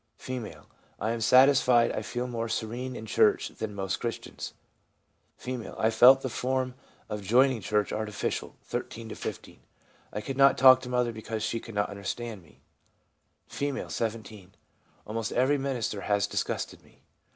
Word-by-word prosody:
F. - - -8 0.5
' - - -35
I 110 - -1
am 115 0 -3
satisfied 125 0 +5
I - - -3
feel 120 0 -3
more 115 -2 -3
serene 120 +4 -3
in 110 - -7
church 110 - +3
than 110 -2 -6
most 95 -2 -2
Christians.' 115 -1 -5 0.8
F. 125 -3 -5
' - - -14
I 110 - +2
felt 125 +4 +7
the - - -1
form 130 +1 -1 0.3
of 105 -1 -4
joining 120 +4 +3
church 105 +2 0
artificial 105 -1 -3
(13 115 -1 -5
to - - -6
15). - - -7 0.5
I 105 - -4
could 135 +5 -5
not 135 0 +6
talk 130 -1 +8
to 125 - -7
mother 125 -1 +1
because 110 0 -5
she 115 +1 -1
could 115 -1 -11
not 105 0 0
understand 105 +2 -5
me.' 85 - -22 0.9
F., 140 -1 -3
17. 110 -2 -4
1 90 +1 -21 0.5
Almost 110 +1 -3
every 135 +4 +2
minister 125 -7 -2
has 100 0 +1
disgusted - - -3
me. - - -25
115 Hz, 165 wpm, -28 LUFS, 105-130 Hz, 0.9 s, talk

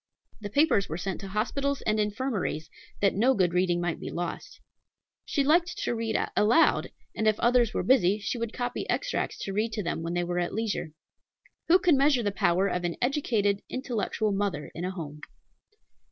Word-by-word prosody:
The 205 -2 -6
papers 225 -5 +2
were 160 - -3
sent 190 +3 -4
to 195 - -6
hospitals 275 +8 -1
and 215 0 +1
infirmaries, 210 - -2 0.3
that 200 - +3
no 250 +6 +3
good 180 -3 +2
reading 180 -1 +2
might 175 -1 -2
be - - -6
lost. 175 0 -5 0.7
She 285 -5 0
liked 340 +5 +2
to - - -1
read 225 -1 -1 0.2
aloud; 235 +11 +4 0.3
and 220 - 0
if 215 -1 +2
others 240 -2 +3
were - - 0
busy, 210 -7 +4
she 215 +4 -3
would 230 -1 -3
copy 245 0 -4
extracts - - -1
to 195 - -4
read 220 +2 -1
to 210 - -2
them 170 -1 -2
when 165 +1 -3
they 175 - +1
were 175 0 -2
at 175 - -2
leisure. 215 -8 -2 0.7
Who 350 - +7
can 350 -6 +3
measure 275 -3 +3
the 205 - 0
power 190 -1 +2
of 180 -2 -2
an 175 -1 -1
educated, 225 -7 +1
intellectual 230 -4 -2
mother 195 -6 -2
in 170 - -4
a - - -1
home? 150 -5 -7
210 Hz, 190 wpm, -28 LUFS, 180-245 Hz, 0.7 s, Who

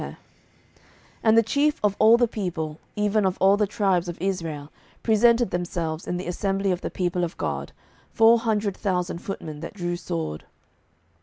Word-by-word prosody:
07:020:002 - - -6 1.1
And 220 0 +4
the 230 - +6
chief 290 +6 +1
of 205 -1 +2
all 220 +2 +7
the 240 0 +3
people, 165 -8 -4 0.2
even 210 0 +1
of 190 -1 0
all 195 +1 +5
the 210 0 +1
tribes 190 -4 +1
of 170 - -7
Israel, 165 -6 -3 0.3
presented 235 0 +4
themselves 170 -2 -3
in 180 - -2
the 180 - -5
assembly 195 +2 -1
of 180 0 -2
the - - -3
people 180 -1 -1
of 170 - -4
God, - - -3 0.4
four 230 +1 +5
hundred 215 -4 0
thousand 180 -4 -2
footmen 160 -6 -6
that 165 +6 -8
drew 175 -2 -2
sword. 80 - -4
190 Hz, 170 wpm, -24 LUFS, 175-215 Hz, 1.1 s, all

